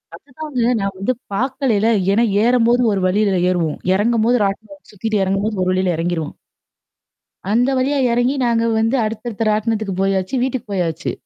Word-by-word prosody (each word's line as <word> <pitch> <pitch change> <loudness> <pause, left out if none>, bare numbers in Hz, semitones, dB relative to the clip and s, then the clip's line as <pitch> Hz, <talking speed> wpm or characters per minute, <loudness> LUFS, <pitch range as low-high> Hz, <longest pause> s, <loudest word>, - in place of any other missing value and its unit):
அதுதாங்க 285 -1 -7 0.2
நான் 195 0 -2
வந்து 200 +7 -1 0.2
பார்க்கலைல. 245 -2 0 0.2
ஏன்னா 225 +4 +3 0.2
ஏறும்போது 240 0 +3
ஒரு 195 -2 -1
வழியில 200 0 +1
ஏறுவோம். 165 -4 -1 0.2
இறங்கும்போது 230 +4 +2
ராட்டின 220 +9 -5
சுத்திட்டு 210 0 -2
எறங்கும்போது 200 +3 -1
ஒரு 185 - 0
வழியில 185 -2 0
இறங்கிருவோம். 165 -2 -3 1.2
அந்த 245 +4 +2
வழியா 275 +3 +1
இறங்கி 245 +4 +1
நாங்க 230 -1 +1
வந்து 225 +4 +1
அடுத்தடுத்த 220 0 -3
ராட்டணத்துக்கு 215 -2 -1
போயாச்சு, 195 +4 0
வீட்டுக்கு 260 -4 -3
போயாச்சு. 170 -2 -2
215 Hz, 140 wpm, -19 LUFS, 195-245 Hz, 1.2 s, ஏன்னா